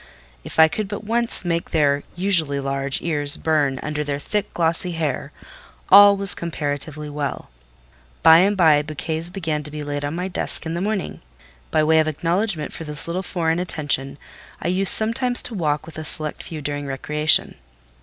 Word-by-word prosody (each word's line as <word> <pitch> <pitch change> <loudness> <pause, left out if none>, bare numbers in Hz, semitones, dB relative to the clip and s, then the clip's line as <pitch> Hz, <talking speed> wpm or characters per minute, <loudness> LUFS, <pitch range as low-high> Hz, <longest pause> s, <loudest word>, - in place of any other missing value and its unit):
If - - -8
I 160 0 +8
could 210 +6 -3
but 205 +1 -6
once 230 -2 0
make 170 -1 -1
their 145 -3 +2
(usually 170 -6 +1
large) 135 0 -2
ears 145 -3 0
burn 145 -4 0
under 150 0 -2
their 145 -1 -3
thick 205 +8 -3
glossy 170 +1 -1
hair, 160 -4 -3 0.6
all 200 +1 +8
was 195 -1 +1
comparatively 150 -2 -4
well. 145 - -5 0.7
By 160 0 +8
and 200 +3 +2
by 155 -5 +5
bouquets 155 +2 -4
began 165 -5 -3
to 150 - -9
be 150 0 -6
laid 145 0 -4
on 145 +2 -3
my 180 +2 -3
desk 180 - -1
in 160 - -3
the 170 - -3
morning; 205 -1 -3 0.5
by 155 - +2
way 160 +1 +4
of 155 - +2
acknowledgment 170 +1 -1
for - - -7
this 150 -2 -5
little 170 +2 -3
foreign 170 -3 -1
attention, 145 -6 -2 0.4
I - - -2
used 190 +1 +3
sometimes 245 +3 +1
to 245 - -6
walk 150 -7 -1
with 160 -1 -9
a - - -5
select 155 0 -1
few 155 -3 -7
during 145 0 -4
recreation. 150 +3 +2
160 Hz, 180 wpm, -21 LUFS, 150-180 Hz, 0.7 s, I